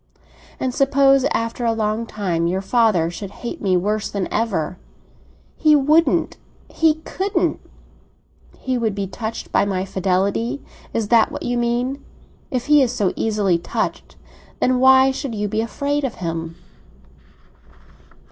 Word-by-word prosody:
"And 255 -1 -1
suppose 275 0 +4
after 230 -1 -1
a 230 -1 +2
long 220 +1 -1
time 175 -6 -1
your 190 +3 -1
father 195 -7 +2
should 195 +3 -7
hate 235 - -7
me 185 -3 +2
worse 210 +4 -1
than 200 -2 -2
ever?" 185 -6 -1 0.8
"He 305 -2 +5
wouldn't—he 310 +1 +1
couldn't!" 390 +2 -1 1.0
"He 255 -1 -2
would 220 -4 -1
be 200 -1 -2
touched 220 +4 -6
by - - +3
my 190 -2 -1
fidelity? 195 +7 0 0.3
Is 220 -3 -2
that 230 -2 +4
what - - -6
you 245 - -1
mean? 245 +3 -1 0.5
If 250 -2 -2
he 295 -1 +5
is 250 -3 +2
so 200 -6 0
easily 205 -6 +1
touched, - - -4 0.4
then 255 0 +2
why 265 +1 +6
should 265 -3 -5
you 210 0 -1
be 215 +2 -1
afraid 285 +5 -2
of 260 -4 -2
him?" 165 -1 -4
225 Hz, 140 wpm, -21 LUFS, 195-260 Hz, 1.0 s, why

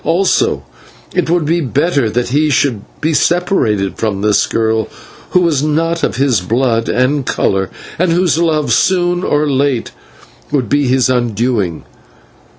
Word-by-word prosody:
Also, 180 +3 +1 0.5
it - - 0
would 170 -2 +1
be 170 +3 +1
better 140 -2 0
that 120 +2 -1
he 150 +4 +1
should 130 -6 +1 0.2
be 160 +1 0
separated 130 - 0
from 105 -3 -2
this 105 -2 +2
girl, 110 -1 0 0.4
who 180 - +2
was 160 -6 +1
not 165 +2 0
of - - 0
his 125 -6 +1
blood 115 +3 0
and 130 +3 +1
colour, 95 -5 -1 0.3
and 180 -1 +2
whose 170 -1 +2
love 155 -7 +1
soon 175 +4 +1
or 150 +1 +1
late 135 -3 0 0.6
would 135 -5 0
be 145 +4 +1
his 130 0 +2
undoing. 120 -7 -1
140 Hz, 150 wpm, -14 LUFS, 115-165 Hz, 0.6 s, this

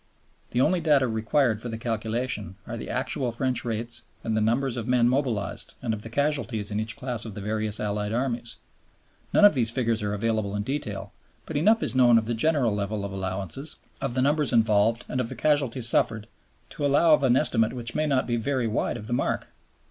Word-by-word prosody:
The 120 - +1
only 175 +6 +3
data 145 -5 +3
required 110 +1 +1
for 120 - -2
the 110 - -4
calculation 110 -3 -2
are - - -5
the - - -7
actual 125 -3 -1
French 130 +2 -1
rates 115 0 -4 0.2
and 110 - -1
the 110 - +1
numbers 120 +4 +1
of 120 -1 -4
men 125 -1 +3
mobilized 125 -5 -1
and 115 -3 -2
of 105 - -5
the 115 - -8
casualties 125 -6 -1
in 105 - -1
each 110 0 -3
class 125 -4 -2
of 110 -4 -7
the - - -5
various 110 +1 -2
Allied 105 0 -2
Armies. 120 -1 -2 0.8
None 205 - +6
of 205 - +7
these 120 -5 +1
figures 115 -2 0
are 105 0 -1
available 110 -1 -1
in 105 - -1
detail, 105 -7 -4 0.3
but 160 - -7
enough 210 +9 +4
is - - 0
known 125 -2 +6
of 110 - +1
the 120 - -1
general 125 -1 +2
level 100 0 -2
of 100 - -5
allowances, 95 - -4 0.3
of 120 - -2
the 130 - +2
numbers 150 +1 +2
involved, 115 -1 +3
and 130 - -1
of 115 - -3
the - - -5
casualties 135 -5 +1
suffered 110 -2 +1 0.5
to - - -5
allow 145 +3 +5
of 150 - +4
an 130 -2 +4
estimate 115 -3 +2
which 120 -1 -4
may 155 0 0
not 135 -3 +2
be 120 -1 0
very 130 +1 0
wide 115 +2 -1
of 105 - -8
the 120 - -3
mark. 120 - -1
115 Hz, 215 wpm, -26 LUFS, 110-130 Hz, 0.8 s, of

